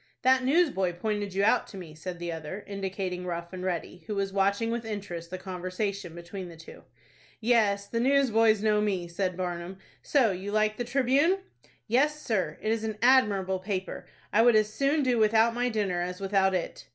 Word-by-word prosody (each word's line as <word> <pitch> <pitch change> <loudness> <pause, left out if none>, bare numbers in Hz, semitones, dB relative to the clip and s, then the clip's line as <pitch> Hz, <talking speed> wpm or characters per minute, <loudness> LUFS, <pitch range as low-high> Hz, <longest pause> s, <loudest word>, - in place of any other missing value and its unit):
"That 260 0 +4
newsboy 265 - +2
pointed 205 +1 -3
you 195 - +2
out 225 +4 +3
to 200 - -10
me," 170 -4 -9
said 175 +3 -7
the 170 0 -4
other, 165 +5 -6
indicating 190 -2 -4
Rough 170 0 -5
and 185 0 -6
Ready, 175 -1 -4
who 210 - -3
was 195 -1 -2
watching 200 +3 +1
with 235 0 -2
interest 195 -6 -6
the 185 - -5
conversation 185 0 -4
between 175 +2 -7
the 165 - -12
two. 165 - -13 0.5
"Yes, 215 -4 +2
the 230 +3 -3
newsboys 230 -5 +3
know 210 -1 +3
me," 190 -4 -1
said 180 +1 -2
Barnum. 180 0 -4 0.2
"So 255 -7 +3
you 190 +2 -5
like 215 0 +1
the 245 - -2
'Tribune'?" 275 +9 +2 0.4
"Yes, 290 +6 +2
sir, 190 - -1
it 215 - +1
is 225 -1 -1
an 220 -1 -3
admirable 205 -7 +4
paper. 190 0 -4 0.3
I 220 - +5
would 240 -1 +5
as 215 0 +2
soon 280 +4 +1
do 250 -3 +2
without 220 +1 +4
my 245 +1 0
dinner 200 -6 -1
as 180 +1 -4
without 195 -1 +2
it." 180 - -4
200 Hz, 190 wpm, -28 LUFS, 185-230 Hz, 0.5 s, I